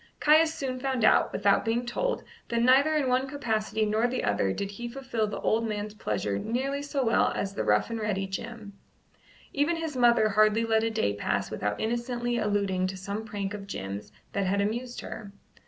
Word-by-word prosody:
Caius 315 +2 +5
soon 265 -5 -4
found 260 -3 0
out, - - +4
without 200 -1 +2
being 235 +2 0
told, - - -1 0.3
that 235 0 +1
neither 275 +5 +5
in 290 -3 +1
one 255 +1 +2
capacity 220 -6 -1
nor 215 +3 +2
the 250 +1 -2
other 100 -2 +1
did 200 - -3
he 240 +4 -6
fulfil 245 -4 -2
the 210 - -5
old 225 +1 +1
man's 210 -1 -3
pleasure 105 - -2
nearly 270 - -2
so 285 -2 -1
well 225 - +3
as 195 0 -2
the - - -2
rough - - +2
and 230 - -2
ready 205 -3 -1
Jim. 210 +2 -6 0.8
Even 295 +4 +2
his 325 -3 -4
mother 240 -3 +4
hardly 215 +2 +3
let 220 -1 +2
a 225 - +1
day 220 - 0
pass 100 - -2
without 105 0 -2
innocently 240 +1 -1
alluding 200 -3 0
to 190 0 -5
some 200 +3 -4
prank 205 -2 -4
of 200 -1 -7
Jim's 100 - -6 0.2
that 200 -1 0
had 200 +2 +1
amused 240 +5 -2
her. 205 -2 -8
225 Hz, 195 wpm, -28 LUFS, 200-255 Hz, 0.8 s, Caius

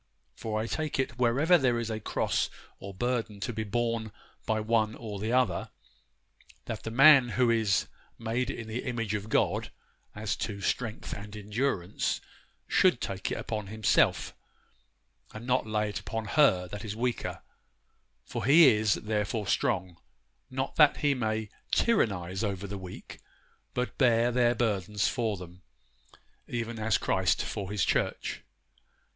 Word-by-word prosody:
For 110 -1 -3
I 110 - -1
take 155 +5 -2
it, 125 -3 -2
wherever 140 +9 +4
there 125 -3 +2
is 115 -1 -2
a 110 - -3
cross - - 0 0.3
or 100 - -7
burden 115 0 -2
to 120 - -2
be 110 0 -2
borne 115 0 -1 0.4
by 110 0 +1
one 110 0 +1
or 105 -4 -6
the 110 +3 -2
other, 125 -8 +1 1.0
that 110 - -5
the - - -5
man 135 +1 +7
who 125 -2 +4
is 110 -4 +2 0.3
made 120 +2 -1
in 115 -4 -5
the 115 +3 -3
image 115 -4 -2
of 105 +1 -3
God, - - +1 0.5
as 105 0 -2
to 100 -3 -4
strength 110 +4 -2
and 105 +1 -8
endurance, 105 -2 -1 0.5
should - - +4
take 95 -1 -3
it - - -2
upon 105 -3 -4
himself, 110 +1 +2 1.0
and 110 +2 -7
not 125 -2 +1
lay 105 -1 0
it 100 - -4
upon 115 -1 -4
her 95 -12 +4
that 105 +2 -6
is 105 -2 -5
weaker; 120 +1 -2 0.8
for - - -4
he 150 +2 +8
is 105 -1 +3
therefore 105 0 -2
strong, 90 -2 0 0.5
not - - -3
that - - +6
he 145 - +4
may 110 -4 -2 0.2
tyrannize 95 - +1
over 100 -2 -2
the 100 0 -5
weak, 90 -1 -10 0.6
but 125 0 -2
bear 120 -2 +4
their 120 0 +3
burdens 105 -3 0
for 115 -5 -1
them, 90 0 -11 0.9
even 115 -1 -4
as 110 0 +2
Christ - - +1
for 95 -2 -4
His 105 -2 +1
church. - - -1
110 Hz, 150 wpm, -29 LUFS, 105-120 Hz, 1.0 s, he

